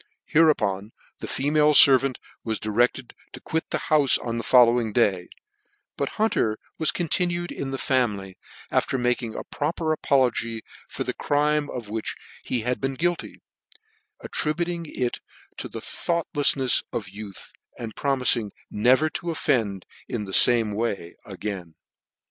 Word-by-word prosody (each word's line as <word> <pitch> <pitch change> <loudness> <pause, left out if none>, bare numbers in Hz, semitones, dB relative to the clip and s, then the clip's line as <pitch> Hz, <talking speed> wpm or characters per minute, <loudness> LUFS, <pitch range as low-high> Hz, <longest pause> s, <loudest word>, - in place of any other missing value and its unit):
Hereupon 110 -11 +2 0.3
the - - -6
female 150 +2 +2
fervant 135 -1 +7 0.3
was 110 -1 -3
directed 120 +4 0 0.2
to - - -8
quit 160 0 -3
the - - 0
houie 145 -4 +3
on 115 -1 -2
the - - -4
following 120 -2 +4
day, 95 -7 +1 0.7
but - - -3
Hunter 115 - +1 0.2
was 160 - +1
continued 175 0 -1
in 135 - -5
the 135 - -3
family, 105 -9 -1 0.4
after 135 - +1
making 120 -2 -1
a - - -5
proper 160 +2 -2
apology 120 -6 +1 0.3
for - - -4
the - - -3
crime 150 0 0
of 115 -4 -6
which 110 0 -3 0.3
he 120 - -2
had 125 +2 -2
been 135 0 -1
guilty, 175 +4 -2 0.8
attributing 170 +2 -2
it 125 -4 -3 0.4
to - - -5
the - - -8
thought 170 -1 -2
lefihefs 140 -3 +4
of 110 - -4
youth, 100 +1 -9 0.3
and 115 -2 -6
promifing 125 -5 +1 0.2
never 130 +8 +3
to 170 +2 -5
offend 115 - 0 0.2
in 105 - -3
the 95 - -8
fame 115 -1 +5
way 100 -5 -3
again. 95 -6 -6
125 Hz, 145 wpm, -24 LUFS, 110-150 Hz, 0.8 s, fervant